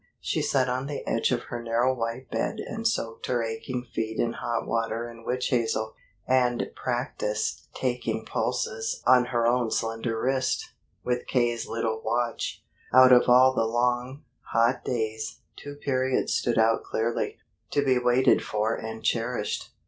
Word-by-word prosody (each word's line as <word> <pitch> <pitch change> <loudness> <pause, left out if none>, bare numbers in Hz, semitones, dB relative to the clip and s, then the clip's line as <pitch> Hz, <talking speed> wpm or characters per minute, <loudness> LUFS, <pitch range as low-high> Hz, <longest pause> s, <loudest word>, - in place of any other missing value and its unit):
She - - -1
sat 130 -2 +2
on 130 +2 -2
the 145 - -5
edge 115 - +1
of 120 -1 0
her 120 - -4
narrow 120 +2 +1
white 120 +1 -4
bed - - -1
and 225 +1 -2
soaked 115 - -2
her 120 -2 +1
aching 115 +3 -4
feet 110 0 -2
in 115 0 0
hot 120 -1 -2
water 115 0 -1
and 115 -1 -12
witch 125 +2 -1
hazel, 115 -4 0 0.3
and 125 -2 +2
practiced 135 - -2
taking - - -2
pulses 465 0 -2
on 125 -1 +6
her 120 -1 0
own 120 -1 +2
slender 115 0 -2
wrist, 130 +2 0 0.3
with 125 0 -1
K.'s 120 -2 +1
little 115 -1 -2
watch. 120 -1 -2 0.3
Out 130 0 +8
of 125 0 +6
all 130 +1 +7
the 115 -3 +1
long, 125 +4 0 0.3
hot 115 +3 +2
days, 110 -2 -3
two 145 0 -9
periods 130 -2 0
stood 120 - 0
out 115 0 +3
clearly, 115 +1 -2 0.3
to 145 0 +1
be 130 -2 +3
waited 125 +1 +4
for 110 +2 0
and 110 0 -6
cherished. 115 -1 -1
120 Hz, 155 wpm, -27 LUFS, 115-130 Hz, 0.3 s, Out